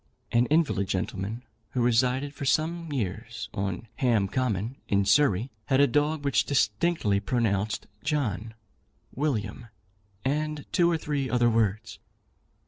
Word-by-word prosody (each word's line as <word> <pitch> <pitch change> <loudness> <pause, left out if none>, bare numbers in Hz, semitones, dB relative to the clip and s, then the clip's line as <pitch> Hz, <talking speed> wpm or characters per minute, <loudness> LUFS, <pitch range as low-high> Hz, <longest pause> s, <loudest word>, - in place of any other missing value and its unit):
An 120 +1 +3
invalid 150 - +2
gentleman, 95 +4 -3 0.3
who 125 - 0
resided 125 +4 +2
for 145 - -7
some 160 +4 0
years 105 -10 -4
on 100 +2 -3
Ham 115 -6 +2
Common, 120 +1 -1
in 100 -1 +2
Surrey, 125 -2 +3 0.2
had 130 - +3
a 140 - +7
dog 145 +2 0
which 125 -8 +3
distinctly 110 -3 +1
pronounced 105 -3 0 0.2
John, 115 - -1 0.6
William, 120 -5 -2 0.6
and 150 +1 -1
two 170 -1 +4
or 170 - +2
three 145 -4 -2
other 120 0 +3
words. 110 0 0
125 Hz, 130 wpm, -27 LUFS, 105-145 Hz, 0.6 s, a